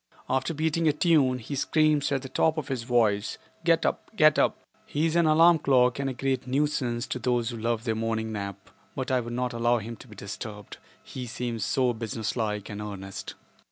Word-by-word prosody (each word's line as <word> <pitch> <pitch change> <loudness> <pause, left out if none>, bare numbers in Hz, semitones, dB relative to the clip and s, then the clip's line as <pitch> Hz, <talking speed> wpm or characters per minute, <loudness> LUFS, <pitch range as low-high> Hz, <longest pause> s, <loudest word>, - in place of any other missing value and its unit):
After 130 +5 0
beating 160 +2 +1
a 150 - +4
tune, 150 -5 +3
he 125 +4 -7
screams 150 +1 +2
at 135 -1 0
the - - -5
top 160 +4 +1
of 150 -3 -4
his 130 -3 -2
voice, 115 -4 +1 0.3
"Get - - +3
up; - - -1
get - - +5
up." - - +2 0.3
He 150 +3 0
is 165 0 0
an 170 -2 +4
alarm 165 +2 +6
clock 125 -3 +3
and 135 -1 -1
a - - -3
great 130 +1 -2
nuisance 130 -3 0
to 125 - -4
those 120 -1 0
who 120 - -5
love 115 0 -1
their 115 -2 0
morning 110 0 -2
nap, 100 -2 -6 0.2
but 130 -1 -3
I 130 - +3
would 120 -1 -5
not 125 0 -1
allow 120 +1 +2
him 115 +1 -6
to - - -14
be 105 - -13
disturbed, 105 +1 -7 0.3
he 125 -2 -7
seems 120 -2 -3
so 125 -2 +2
business 110 -1 -3
like 105 -4 -2
and 105 0 -6
earnest. 95 -2 -7
125 Hz, 210 wpm, -27 LUFS, 110-140 Hz, 0.3 s, alarm